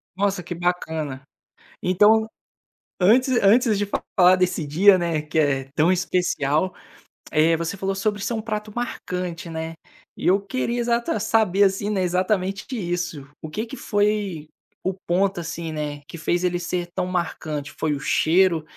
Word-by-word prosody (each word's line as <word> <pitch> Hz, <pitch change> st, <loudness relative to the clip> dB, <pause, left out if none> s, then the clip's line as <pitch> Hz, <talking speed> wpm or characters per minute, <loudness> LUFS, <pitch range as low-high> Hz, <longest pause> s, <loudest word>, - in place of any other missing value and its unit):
Nossa, 195 Hz, -1 st, 0 dB
que 175 Hz, -, -5 dB
bacana. 160 Hz, -6 st, -2 dB, 0.6 s
Então 210 Hz, +4 st, +4 dB, 0.7 s
antes 250 Hz, +7 st, +4 dB
antes 215 Hz, +1 st, +4 dB
de 205 Hz, -, 0 dB, 0.3 s
falar 180 Hz, 0 st, +7 dB
desse 180 Hz, -4 st, 0 dB
dia, 185 Hz, +6 st, +5 dB
né, 165 Hz, -3 st, -1 dB
que 155 Hz, +1 st, -3 dB
é 135 Hz, -3 st, +1 dB
tão 160 Hz, +3 st, +3 dB
especial, 180 Hz, -2 st, 0 dB, 0.6 s
eh, 160 Hz, +2 st, +3 dB
você 170 Hz, +4 st, -3 dB
falou 195 Hz, 0 st, -2 dB
sobre 205 Hz, +1 st, -1 dB
ser 235 Hz, -, -2 dB
um 220 Hz, -, -2 dB
prato 215 Hz, -1 st, -4 dB
marcante, 180 Hz, -8 st, -4 dB
né, 160 Hz, 0 st, -5 dB, 0.4 s
e -, -, -3 dB
eu 190 Hz, +2 st, +5 dB
queria 240 Hz, +3 st, -2 dB
exata 235 Hz, -2 st, 0 dB
saber, 210 Hz, -3 st, +3 dB
assim, 195 Hz, +1 st, +1 dB
né, 195 Hz, -3 st, 0 dB
exatamente 185 Hz, +2 st, 0 dB
de 255 Hz, -, -3 dB
isso, 175 Hz, -6 st, -3 dB
o 155 Hz, -, -6 dB
que 215 Hz, +8 st, -3 dB
que 235 Hz, -, -8 dB
foi 205 Hz, -, -1 dB, 0.4 s
o 190 Hz, -, 0 dB
ponto, 190 Hz, +1 st, 0 dB
assim, 165 Hz, -1 st, -5 dB
né, 150 Hz, -2 st, -4 dB
que -, -, -10 dB
fez 175 Hz, +2 st, 0 dB
ele 175 Hz, -1 st, 0 dB
ser 175 Hz, 0 st, -3 dB
tão 185 Hz, -1 st, -1 dB
marcante. 155 Hz, -5 st, -3 dB
Foi 155 Hz, -2 st, 0 dB
o 140 Hz, -, -3 dB
cheiro 165 Hz, +2 st, +3 dB
180 Hz, 165 wpm, -23 LUFS, 160-205 Hz, 0.7 s, falar